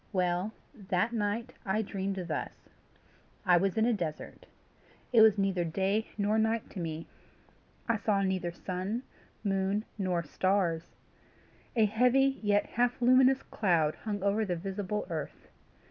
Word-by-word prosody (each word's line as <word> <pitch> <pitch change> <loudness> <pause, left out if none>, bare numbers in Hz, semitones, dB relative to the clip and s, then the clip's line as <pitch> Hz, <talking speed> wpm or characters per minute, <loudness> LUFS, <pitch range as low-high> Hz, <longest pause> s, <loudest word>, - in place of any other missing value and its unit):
Well, 180 +1 0 0.2
that 200 -1 -1
night, 225 +3 -2
I 210 +3 0
dreamed 195 -1 -3
thus: - - -5 0.8
I 180 -2 +6
was 195 +3 0
in 220 - +4
a 240 - +3
desert. 165 -7 -5 0.7
It 230 - +7
was 220 -2 +7
neither 195 -3 +1
day 195 +6 0
nor 210 +1 +2
night 220 0 0
to 195 - -7
me. 165 -1 -4 0.8
I 230 -2 +2
saw 205 -2 +1
neither 185 -2 -1
sun, 185 +7 -4 0.4
moon, 195 +1 0
nor 180 -3 0
stars. 175 0 0 0.8
A 225 -2 +5
heavy, 250 +5 +3
yet 205 -1 +2
half 245 +1 0
luminous 255 +2 +5
cloud 165 -7 +1
hung 205 -3 -5
over 200 +2 +2
the 185 -4 -1
visible 195 +3 -3
earth. 155 -3 -6
200 Hz, 140 wpm, -30 LUFS, 185-220 Hz, 0.8 s, It